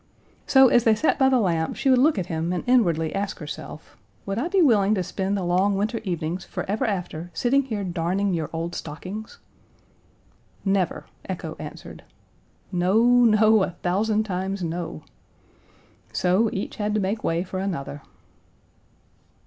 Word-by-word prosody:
So, 265 -1 +7
as 240 - +4
they 225 -2 +4
sat 305 +7 +1
by 265 -1 +5
the 260 - +3
lamp 165 -6 0
she - - -2
would 260 -2 +5
look 295 +1 +4
at 185 - -1
him 165 0 -2
and 180 - -2
inwardly 170 -11 +2
ask 195 0 -3
herself, 150 0 -9 0.3
"Would 195 +2 -2
I 290 - -1
be 385 +2 +1
willing 215 - +4
to 185 - -1
spend 195 +3 -2
the 190 - -2
long 185 +3 +2
winter 215 +4 -1
evenings 175 -2 -3
forever 215 +6 -3
after 175 -4 -4
sitting 255 +9 +2
here 215 -6 -3
darning 185 +2 -1
your 160 -3 -2
old 165 +1 -4
stockings?" 185 +8 -7 1.3
Never, 195 -2 0 0.2
echo - - -5
answered. - - -9 0.7
No, 185 +5 +2
no, 225 -3 +5
a - - +1
thousand 210 +4 +1
times 190 -1 -3
no. 165 - -4 1.1
So, 185 +5 +2
each 195 - -4
had 210 0 -1
to - - +2
make 205 +3 -2
way 165 +1 0
for 185 0 -5
another. 155 -7 -4
195 Hz, 155 wpm, -24 LUFS, 175-220 Hz, 1.3 s, So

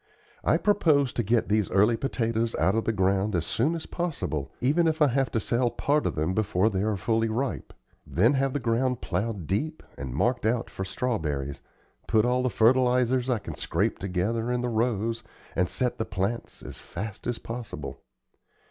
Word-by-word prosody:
I - - +3
propose 155 - +3
to - - 0
get 115 +1 +1
these 105 -1 +1
early 105 +5 +4
potatoes 115 -3 -1
out 95 - +2
of 110 0 0
the - - +2
ground 95 0 +1
as 85 -1 0
soon 150 +9 +1
as 165 - -5
possible, 140 - -3
even 155 +7 +3
if 160 -1 0
I 150 -2 +5
have 135 0 +1
to 115 - 0
sell 120 +3 +1
part 145 +5 +1
of - - -2
them 80 +4 0
before 105 0 +2
they 95 -1 -1
are 105 -1 0
fully 115 +3 +1
ripe; 125 +4 -2 0.4
then 110 - +3
have 135 -1 +1
the 145 - 0
ground 125 +1 0
plowed 100 -1 -2
deep 150 - -2 0.2
and 65 -3 -5
marked 120 - +1
out 115 +1 0
for 95 - -4
strawberries, 80 - -2 0.5
put 110 0 +3
all 125 +1 +2
the 130 - +1
fertilizers 125 +2 +3
I 125 - +2
can 90 -6 -7
scrape 95 - -1
together 100 +6 -1
in 125 0 0
the 125 - -1
rows 115 0 0 0.3
and 90 +1 +1
set 125 -1 -1
the 110 - 0
plants 95 +5 -3
as - - -9
fast 110 +1 -6
as 120 -1 -1
possible. 75 - -7
115 Hz, 190 wpm, -27 LUFS, 95-125 Hz, 0.5 s, I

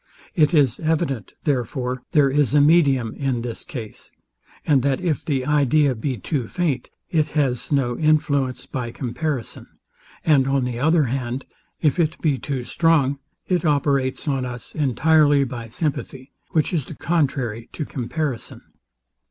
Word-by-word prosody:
It 150 -5 +3
is 140 -7 +3
evident, 155 - -1
therefore, 125 -2 -1
there 140 -3 +4
is 145 0 +2
a - - +6
medium 140 -7 +4
in 130 -4 -2
this 120 -2 -4
case; 120 -11 -8 0.5
and 140 -4 +4
that 135 0 +1
if 170 -6 -1
the 135 -5 -1
idea 145 0 +3
be 125 +2 -3
too 130 -4 -2
feint, 150 -7 -1 0.2
it 155 -3 +2
has 130 -4 0
no 130 -4 +1
influence 145 -4 +1
by 125 -3 -4
comparison; 125 +1 -4 0.6
and 140 -5 +4
on 135 -1 +1
the 120 -1 -3
other 160 +3 +3
hand, 125 0 -3 0.4
if 155 +3 +2
it 160 -2 +1
be 145 -5 +1
too 135 -3 -3
strong, 140 -2 +2 0.3
it 180 -3 +1
operates 140 -2 +1
on 135 -3 0
us 125 -1 -7
entirely 145 +1 +3
by 120 -3 -5
sympathy, 135 0 -4 0.2
which 155 +2 +1
is 155 -7 0
the 160 - -9
contrary 135 -10 -1
to 150 - -4
comparison. 130 0 -4
140 Hz, 150 wpm, -22 LUFS, 125-155 Hz, 0.6 s, a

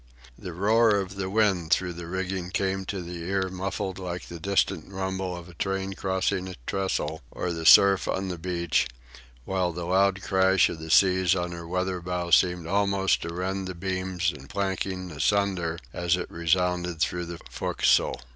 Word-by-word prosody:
The 90 - -8
roar 105 +5 +3
of 95 -2 -2
the 95 -1 -4
wind 95 -5 +2
through 90 +1 +2
the 85 0 -8
rigging 95 0 -3
came 95 0 -1
to 95 -1 -4
the 85 0 -7
ear 95 +2 -1
muffled 95 0 -4
like 90 -1 -5
the 85 - -7
distant 95 -1 0
rumble 95 -1 -3
of 85 0 -10
a 90 - -13
train 95 +2 -2
crossing 95 0 -1
a 90 - -7
trestle 95 -5 -2
or 90 - -3
the 80 -1 -2
surf 100 -1 +7
on 95 0 -1
the 90 -2 -5
beach, 85 -4 0 0.6
while 95 -2 0
the 85 +1 -5
loud 95 +2 +2
crash 95 0 +3
of 80 - -6
the 80 0 -8
seas 95 0 +4
on 90 -1 -2
her 85 -1 -7
weather 90 +1 -2
bow 90 0 -3
seemed 90 0 +4
almost 100 +1 +1
to 85 - -4
rend 95 +2 -3
the 95 - -6
beams 95 0 -1
and 70 0 -12
planking 95 -1 -2
asunder 85 +1 0 0.2
as 85 0 +1
it 90 - -5
resounded 90 0 0
through 85 +1 0
the 85 0 -6
fo'castle. - - +1
90 Hz, 180 wpm, -26 LUFS, 85-95 Hz, 0.6 s, surf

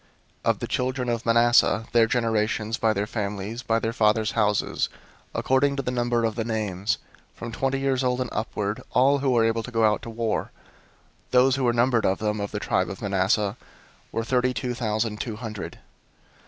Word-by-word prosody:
001:034 - - +3
Of - - +2
the - - -4
children 125 0 -1
of 115 0 -2
Manasseh, 115 -1 +4
their 115 -1 +5
generations, 110 -1 0
by 110 - +3
their 100 -1 -1
families, 105 +1 -4
by 115 -2 +1
their 115 0 -1
fathers' 110 -1 +2
houses, 105 -4 +1 0.5
according 140 +2 +2
to 135 - -2
the 125 - -2
number 120 -1 +1
of 110 - 0
the 115 +1 -2
names, 105 -4 -1 0.4
from 115 - -7
twenty 135 +3 -1
years 135 -1 0
old 125 0 +1
and 125 -1 -2
upward, 105 +1 -2
all 140 +3 +4
who 135 0 0
were 120 -3 +3
able 115 0 +1
to 120 - -8
go 115 -2 +2
out 105 -1 +2
to - - -8
war; 115 -1 -2 0.8
001:035 - - -37
those 130 +1 +4
who 135 - -2
were 120 - +3
numbered 120 -1 +2
of 95 - +1
them, 105 0 -1
of 100 0 -3
the 105 - -4
tribe 90 -3 0
of 100 - -7
Manasseh, 100 0 +1 0.5
were 115 - -1
thirty 125 +1 +1
two 125 +3 -2
thousand 110 -2 -1
two 115 -3 -4
hundred. 105 -7 -6
115 Hz, 200 wpm, -25 LUFS, 105-125 Hz, 0.8 s, their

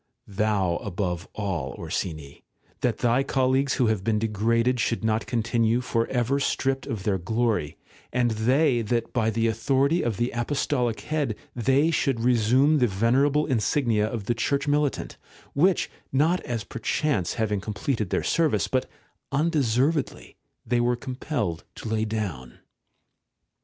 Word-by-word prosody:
Thou 100 -4 0
above 90 -3 -3
all, 95 -10 -3
Orsini, 75 -5 -5 0.4
that 120 -4 0
thy 120 +3 +3
colleagues 135 0 +1
who 125 - +2
have 110 -4 0
been, 110 +1 +1
degraded 115 +3 +1
should 115 0 0
not 110 0 0
continue 115 0 +1
for 115 -2 -1
ever 125 +2 0
stripped 135 -1 -1
of 105 -4 -4
their 95 -2 0
glory; 110 -4 -1 0.3
and 120 -1 +1
they, 125 +4 +2
that 115 +2 -2
by 115 -3 +2
the 115 +1 0
authority 135 +8 +2
of 115 -5 -1
the 120 +1 0
Apostolic 125 -1 -1
Head 150 -8 -1 0.2
they 135 +7 +2
should 135 -5 +1
resume 125 +5 +3
the 125 - +4
venerable 130 +9 +2
insignia 115 -3 +1
of 110 -1 -4
the 120 - +1
Church 140 +5 -1
Militant, 145 -1 0 0.4
which, 175 +5 +3 0.2
not 160 +7 +2
as 120 -7 -4
perchance 115 - -1
having 105 -3 -1
com 105 +1 -5
pleted 110 -4 -1
their - - 0
service, 165 -3 +1
but 130 -1 -1 0.4
undeservedly, 145 -1 0 0.3
they 120 -1 +1
were 120 0 +2
com 130 +1 -6
pelled 110 - -3
to - - -7
lay 110 0 0
down. 95 - -4
120 Hz, 145 wpm, -25 LUFS, 110-135 Hz, 0.4 s, the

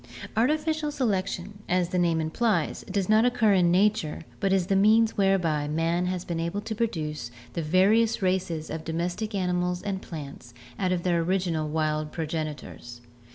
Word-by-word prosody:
— - - -11
Artificial 305 +6 +1
selection, 205 -6 -2
as 180 -1 +1
the 180 -1 0
name 170 -2 +2
implies, 165 +2 0
does 195 -1 -1
not 215 +1 +5
occur 240 -4 +3
in 180 -3 +4
nature 185 -4 +1 0.2
but 195 - +1
is 190 -2 +2
the 195 - +1
means 220 +3 +4
whereby 180 -7 +2
man 165 +3 0
has 180 -1 -3
been 170 -1 -3
able 170 +5 -2
to 220 - -4
produce 155 - -3 0.2
the 170 - -2
various 195 +8 +3
races 185 -4 -1
of 160 - -4
domestic 175 +7 -3
animals 180 -1 -1
and 195 -2 -3
plants 140 -6 -9 0.2
out 185 -1 +1
of 175 -1 -1
their 175 -2 +2
original 170 -3 0
wild 155 -1 -1
progenitors. 155 -7 -5
180 Hz, 165 wpm, -26 LUFS, 160-205 Hz, 0.2 s, not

